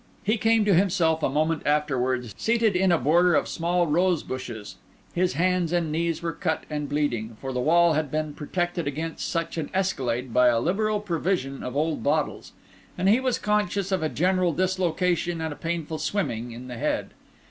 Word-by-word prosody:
He 215 +2 +1
came 225 0 +3
to 205 - +4
himself 170 -3 +2
a - - +1
moment 155 +3 0
afterwards, 130 -6 0
seated 225 -3 +1
in 185 0 +3
a 170 - +4
border 170 +5 +3
of - - +2
small 175 +1 0
rosebushes. 140 - -1 0.4
His 180 +1 +1
hands 180 0 +1
and 170 -3 0
knees 165 +1 -1
were 165 - -1
cut 160 -4 -2
and 150 -1 -3
bleeding, 120 -7 -1
for 135 -1 -5
the 125 - -1
wall 170 +5 +4
had 155 -1 0
been 155 +1 -2
protected 175 +2 -2
against 160 +3 -3
such 165 0 -2
an 150 - -4
escalade 130 -10 -1
by 125 0 +5
a 120 -2 +4
liberal 210 - 0
provision 170 -7 -2
of 125 - -5
old 155 +2 0
bottles; 150 +1 -1 0.5
and 185 +2 +2
he 225 +5 +5
was 260 -2 0
conscious 205 -2 0
of 190 -3 +1
a 155 - 0
general 180 +1 +1
dislocation 180 -1 0
and 160 -2 -3
a - - -11
painful 165 -1 -3
swimming 120 - -2
in 120 +2 -9
the 125 -2 -7
head. - - -1
165 Hz, 185 wpm, -25 LUFS, 145-185 Hz, 0.5 s, by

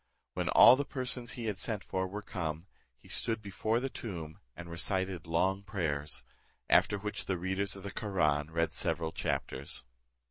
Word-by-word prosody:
When - - -1
all 120 - +9
the 140 - 0
persons 125 -3 -2
he 120 - -5
had 105 -3 -2
sent 105 -4 -1
for 95 0 -1
were 105 +3 -6
come, 80 -4 -3 0.3
he - - -19
stood 115 -1 +2
before 110 +3 0
the 135 - -1
tomb, 85 - -6 0.2
and 85 - -8
recited 90 0 -2
long 95 +4 +2
prayers; 75 -8 -2 0.5
after 105 - +5
which 105 +1 -4
the 95 - 0
readers 95 +2 -1
of 95 - -9
the 100 - -5
Koraun 75 -9 +1
read 85 0 0
several, 80 -1 -1
chapters. 65 -4 -2
95 Hz, 170 wpm, -32 LUFS, 80-105 Hz, 0.5 s, all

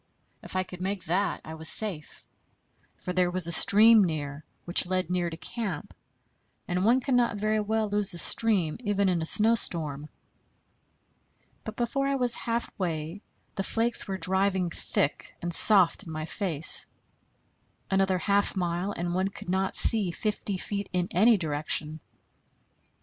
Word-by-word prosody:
If - - -10
I 185 - 0
could 180 -1 -11
make 190 0 -4
that, 190 +4 -2
I 160 - -8
was 160 0 -2
safe; 185 -9 -1 0.7
for 180 - -6
there 180 -1 +1
was 180 -1 +1
a 170 - +1
stream 215 +6 +6
near, 150 -3 -4 0.2
which 175 +1 +4
led 185 -1 -2
near 175 -1 -1
to 165 - -9
camp; 185 0 -6 0.7
and 180 +1 -2
one 240 +5 +3
cannot 245 -4 0
very 215 +1 0
well 215 +1 -1
lose 205 -1 0
a - - -6
stream, 190 -5 +1
even 205 -4 0
in 175 -2 -1
a 160 - 0
snowstorm. 165 -10 +1 1.5
But 220 - -8
before 275 +3 -2
I 275 - 0
was 250 -3 +3
halfway 185 -7 -3 0.3
the 200 - -4
flakes 230 +4 -1
were 190 -1 -4
driving 190 0 0
thick 145 - -2
and 175 0 -4
soft 195 -1 +6
in - - -8
my 155 0 -5
face. 170 -2 -1 1.0
Another 190 -1 +1
half 200 +4 0
mile, 180 +2 -3
and 175 0 -4
one 185 +2 0
could 195 - -10
not 190 +1 -1
see 215 -5 +3
fifty 205 +1 -3
feet 200 +2 -5
in 180 -1 -2
any 220 +5 +4
direction. 155 -1 -2
185 Hz, 155 wpm, -26 LUFS, 170-210 Hz, 1.5 s, stream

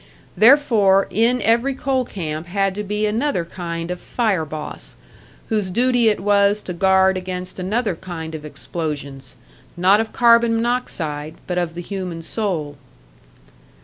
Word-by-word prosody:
Therefore 215 -4 +5
in 240 +3 +2
every 235 +4 +2
coal 260 -1 0
camp 160 -5 -5
had 195 +1 0
to 210 +2 -4
be 210 +1 -1
another 220 - 0
kind 170 -1 -5
of 180 - -4
"fire 205 -9 -1
boss," 155 0 -7 0.5
whose 210 -4 0
duty 240 +3 +3
it 210 - 0
was 205 0 +2
to 180 - -5
guard 190 +1 +3
against 185 0 -5
another 205 +1 -1
kind 160 -2 -7
of 155 -1 -6
explosions 145 -4 -6 0.4
not 190 +4 +5
of 225 0 -2
carbon 235 -1 +4
monoxide, 165 -11 -2
but 180 -1 -1
of 170 -1 -3
the 175 - -5
human 180 -4 -5
soul. 165 -7 -2
190 Hz, 145 wpm, -20 LUFS, 170-225 Hz, 0.5 s, Therefore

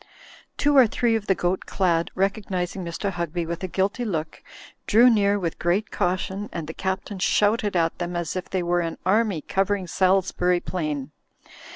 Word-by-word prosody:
Two 290 0 +2
or 255 -3 +8
tly 235 +2 0
ee 225 - +3
of 215 -2 -3
the 190 - +3
goat 180 +1 -1
clad, 170 -3 +1
recognising 190 -1 -1
Mr. 170 +4 -3
Hugby 170 -1 -3
with 170 +2 -5
a - - -1
guilty 195 +7 -1
look, 165 -8 -3 0.5
drew 240 +4 +6
near 205 -2 +3
with 170 -5 -3
great 185 +5 0
cau 180 +1 +1
tion, 195 +2 -5
and 165 - -4
the 160 - -7
Captain 190 +2 -3
shouted 205 +1 +2
at 165 -1 +1
them 175 0 -3
as 170 -1 -3
if 185 - -4
they 185 -2 -1
were 175 0 +1
an 165 -1 -4
army 200 -3 +2
covering 195 +2 0
Salisbury 180 -1 +2
Plain. 150 -6 -4
185 Hz, 185 wpm, -24 LUFS, 175-205 Hz, 0.5 s, or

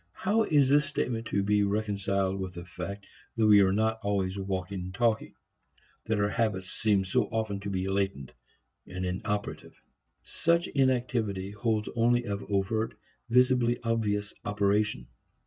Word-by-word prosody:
How 210 +4 +1
is 145 -3 +4
this 145 +2 +4
statement 125 -6 -2
to 100 - 0
be 105 +1 +2
reconciled 100 -2 0
with 95 -2 -5
the 85 0 -7
fact 90 +3 -7 0.3
that 115 -2 +2
we 105 -1 +7
are 95 -1 +4
not 110 +2 +1
always 100 -2 -1
walking 95 -1 -3
and 90 +1 -6
talking; 115 -1 0 0.7
that 110 -1 +1
our 100 0 +2
habits 100 -4 -1
seem 100 -3 +1
so 90 - +1
often 110 -3 -2
to 100 0 -5
be 95 -1 -2
latent, 95 -8 -1 0.6
inoperative? 95 +3 -4 0.4
Such 170 +1 +1
inactivity 120 -8 0
holds 110 0 -1
only 120 +1 +3
of 100 -2 -3
overt, 100 +3 0 0.3
visibly 125 -1 +3
obvious 105 -3 -1
operation. 105 - 0
105 Hz, 145 wpm, -29 LUFS, 95-115 Hz, 0.7 s, we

